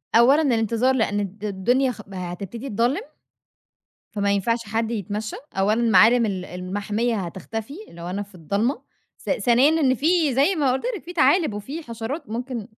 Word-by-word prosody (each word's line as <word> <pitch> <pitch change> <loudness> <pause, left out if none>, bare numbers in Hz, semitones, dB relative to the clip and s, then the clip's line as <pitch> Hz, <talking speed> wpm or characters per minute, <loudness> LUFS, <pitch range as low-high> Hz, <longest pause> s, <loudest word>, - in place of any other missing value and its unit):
أولًا 260 +7 +6
الانتظار 235 -1 +2
لأن 210 -4 +1
الد 200 +1 -5
الدنيا 245 +7 +1
خ 225 - -9
هتبتدي 190 +8 -6
تضلّم، 240 - +1 1.1
فما 200 -1 0
ينفعش 215 +4 +1
حد 220 +2 -2
يتمشّى، 210 -1 -4 0.2
أولًا 210 +4 +2
معالِم 225 +4 +6
ال 190 -3 -3
المحمية 205 +6 -2
هتختفي، 210 - -5
لو 170 0 -10
أنا 200 +2 -2
في 205 -1 -14
الضلمة، 200 - -1 0.4
ث - - -6
ثانيًا 245 +3 +4
إن 260 -3 +3
في 310 +1 +2
زي 280 +9 +3
ما 285 -6 +2
قلت 265 - -2
لكِ - - -9
في 350 - -8
تعالِب 315 - +3
وفي 270 +11 -6
حشرات 240 +4 -6
ممكن 240 -1 -4
230 Hz, 160 wpm, -23 LUFS, 200-260 Hz, 1.1 s, أولًا